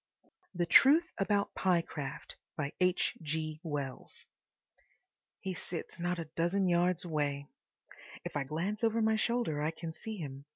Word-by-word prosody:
THE 175 0 +1
TRUTH 310 - +6
ABOUT 200 0 +1
PYECRAFT 170 -6 -1 0.9
He 155 0 -3 1.9
sits 175 0 -6
not 175 +1 0
a 165 - -4
dozen 185 +3 +2
yards 175 0 +2
away. 145 -3 -1 0.8
If - - -5
I 145 - +1
glance 175 - -3
over 225 0 +3
my 220 0 +3
shoulder 220 -9 0
I 155 - +1
can 165 0 -6
see 220 +5 -6
him. 140 -4 -7
175 Hz, 120 wpm, -33 LUFS, 155-205 Hz, 1.9 s, TRUTH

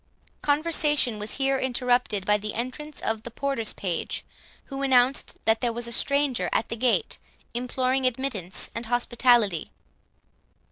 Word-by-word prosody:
Conversation 295 -5 +2
was 210 +1 -4
here 270 -1 +1
interrupted 245 -5 +1
by 210 +1 +3
the 210 +1 -5
entrance 265 +6 -5
of 220 -1 -1
the 235 - -7
porter's 235 -2 -1
page, 180 -4 -3 0.4
who 275 -1 -6
announced 260 0 +3
that 225 0 +3
there 240 -2 +1
was 235 +1 -2
a - - -6
stranger 280 +1 +2
at 230 - 0
the - - -2
gate, 240 +1 +1 0.3
imploring 255 +2 0
admittance 230 -7 -1
and 230 0 -5
hospitality. 240 -6 +2
245 Hz, 140 wpm, -26 LUFS, 225-270 Hz, 0.4 s, by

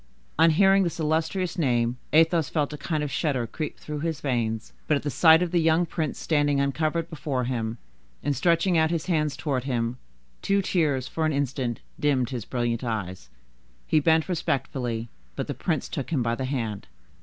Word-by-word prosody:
On 165 +1 +7
hearing 195 +4 +5
this 170 -2 -1
illustrious 165 +4 0
name, 120 -4 +1
Athos 165 -1 +4
felt 150 -2 -1
a - - -5
kind 155 -3 -1
of 145 - -3
shudder 135 -7 0
creep 155 +7 -5
through 150 -1 -6
his 160 -1 -2
veins, 115 -4 -2
but 150 - +3
at - - -7
the 145 - -2
sight 160 +2 +6
of 175 - -3
the 175 -2 +3
young 165 +2 +3
prince 160 -3 -3
standing 145 -3 +1
uncovered 155 +4 0
before 140 -5 -3
him, 115 -2 -2 0.5
and 145 -1 0
stretching 170 +4 +3
out 160 0 +3
his 165 -2 -1
hand 155 -5 0
towards 135 -4 -2
him, 120 -1 -1 0.4
two 200 0 +1
tears, 145 -9 +1
for 160 - -3
an 155 - 0
instant, 135 -4 -2 0.2
dimmed 135 -4 +1
his 120 -5 -4
brilliant 120 -1 -1
eyes. 95 - -4 0.6
He 155 - +3
bent 160 +1 +3
respectfully, 125 -8 -2 0.3
but - - -2
the - - -4
prince - - -2
took 135 - -4
him 140 -7 +1
by 115 0 0
the 130 +2 -2
hand. 115 -7 -3
145 Hz, 190 wpm, -26 LUFS, 125-160 Hz, 0.6 s, On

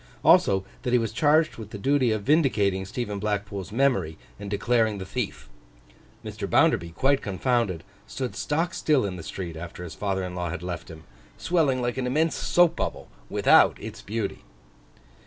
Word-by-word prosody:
Also, 145 - +5 0.2
that 125 - -2
he - - +6
was 115 -2 -2
charged 155 +4 +3
with 110 -2 -8
the 105 - -7
duty 130 +2 +2
of 110 -2 -1
vindicating 105 - +2
Stephen 105 0 -4
Blackpool's 100 -3 -3
memory, 110 - +1 0.2
and 100 0 -6
declaring 110 +1 +1
the 95 - -6
thief. - - -4 0.8
Mr. - - -5
Bounderby 85 - +3
quite 135 +8 +2
confounded, 100 -3 -1 0.2
stood 130 -2 -4
stock 165 +4 -1
still 145 -7 +2
in 95 -2 -3
the 90 - -7
street 85 0 -6
after 85 +2 -8
his 85 - -7
father 95 -2 -2
in 90 -1 -5
law 90 -1 -3
had 85 +1 -5
left 90 -2 -5
him, 80 -1 -11 0.3
swelling 145 -8 +1
like 120 +1 -2
an 125 - -1
immense 155 +5 +1
soap 175 -2 +3
bubble, - - -3 0.2
without - - +4
its - - -8
beauty. 110 -1 -4
105 Hz, 175 wpm, -26 LUFS, 95-135 Hz, 0.8 s, he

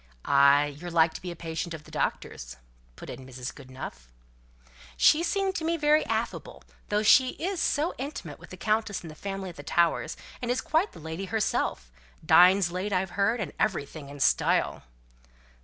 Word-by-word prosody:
"Ay, 140 +1 +4
you're 175 +1 -6
like 165 -1 +3
to - - -8
be 180 - -6
a 170 - -6
patient 165 0 -4
of 155 - -11
the - - -16
doctor's," - - -3 0.4
put - - -11
in 130 - -8
Mrs. 130 0 -7
Goodenough. 130 - -9 0.9
"She 305 - +5
seemed 390 +2 0
to 320 - -4
me 335 +1 0
very 300 0 +3
affable, - - -3 0.3
though 210 +1 +1
she 255 +4 +5
is 365 +1 -3
so 305 +4 +1
intimate 280 +3 -6
with - - -14
the - - -10
Countess 215 -2 0
and 165 - -8
the - - -12
family 195 +1 -5
at 170 - -12
the - - -7
Towers; 165 0 +1 0.2
and 240 - -3
is 250 - +1
quite 325 +7 0
the - - -12
lady 160 +4 -5
herself; 195 - -1 0.3
dines 180 0 +6
late, 185 +4 -3
I've 185 -1 0
heard, 210 +5 +1
and 185 -9 -4
everything 155 -7 -2
in 145 0 -10
style." - - +2
180 Hz, 185 wpm, -27 LUFS, 150-235 Hz, 0.9 s, dines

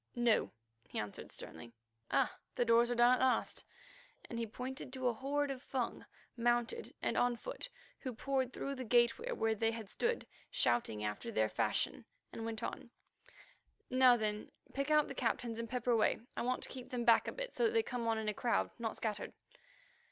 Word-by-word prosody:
"No," 240 -2 +3 0.4
he - - -7
answered 105 -1 -5
sternly. 115 +9 -7 0.4
"Ah! - - +2 0.2
the 245 - +2
doors 235 +1 +5
are 245 - +1
down 240 +1 +6
at 255 - +3
last," 260 -1 +2 0.6
and 235 - -4
he 230 - -1
pointed 255 +3 -6
to 260 -1 -1
a 245 - +3
horde 280 +4 0
of 260 -2 -5
Fung, 260 -3 -3 0.3
mounted 240 - 0
and - - +1
on 245 0 +3
foot, - - -6 0.3
who 260 - -4
poured 260 +1 -1
through 275 - -3
the 260 -2 -4
gateway 240 - +3
where 225 - +1
they 225 +1 +1
had 225 -3 -5
stood, 470 0 0 0.2
shouting 110 -3 +1
after 105 0 -3
their 110 0 +2
fashion, - - 0 0.3
and 225 - -4
went 225 0 -4
on: 235 - -4 1.0
"Now 255 -1 +7
then, 210 -1 -2 0.2
pick 275 +1 -1
out 305 -1 +5
the - - -5
captains 230 -2 -1
and 230 -1 -4
pepper 250 0 0
away. 225 -2 +3 0.2
I - - -2
want 250 +1 0
to - - -1
keep 255 -2 -7
them 240 -2 -2
back 230 - +6
a - - -1
bit, - - -5
so 475 - +3
that 450 - +2
they 450 -1 +4
come 245 - -3
on 225 -1 +2
in 220 -1 -2
a 215 - +1
crowd, 235 +2 +1
not 225 -1 -2
scattered." 215 -2 -3
240 Hz, 195 wpm, -36 LUFS, 225-260 Hz, 1.0 s, Now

